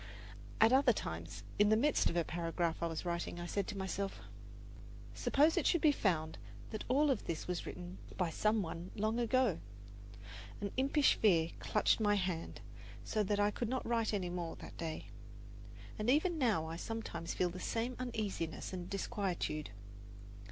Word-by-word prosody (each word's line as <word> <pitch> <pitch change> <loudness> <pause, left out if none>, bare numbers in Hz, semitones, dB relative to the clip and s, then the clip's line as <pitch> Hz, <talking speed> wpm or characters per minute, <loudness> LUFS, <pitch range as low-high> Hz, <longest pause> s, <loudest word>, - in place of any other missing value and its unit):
At 225 +3 +6
other 265 -2 +6
times, 85 - -5 0.2
in 205 0 +6
the 215 - +5
midst 290 +5 +3
of 175 - -2
a 170 - +3
paragraph 170 0 -1
I 170 - +1
was 165 +1 -4
writing, 170 0 -2
I 175 - -4
said 195 +2 -1
to 205 - -4
myself, 195 +1 -3 0.9
"Suppose 300 +4 +3
it - - +3
should 345 - +4
be 305 - +6
found 160 - 0 0.3
that 215 - -4
all 275 +2 +4
this 165 -8 -5
was 180 -1 -3
written 180 +1 -7 0.2
by 180 -3 +1
some 215 +4 +2
one 170 +1 -6
long 215 +2 0
ago!" 240 -5 +2 1.0
An 200 -1 -3
impish 275 +2 +4
fear 170 -6 +3
clutched 210 - +2
my 205 -1 +3
hand, 180 -4 -2 0.4
so 215 - 0
that 205 0 +1
I 205 0 +3
could 235 +1 -3
not 260 +1 -1
write 230 -2 +1
any 185 -4 -1
more 175 -2 -3
that - - -10
day. 160 -2 -5 0.9
And 215 +3 0
even 315 +5 +3
now 215 - +2
I 165 +1 -5
sometimes 170 -5 -4
feel 180 -1 +1
the 180 - -7
same 235 +6 -1
uneasiness 210 -10 -3
and 180 -1 -5
disquietude. 190 -7 -2
200 Hz, 170 wpm, -35 LUFS, 170-230 Hz, 1.0 s, At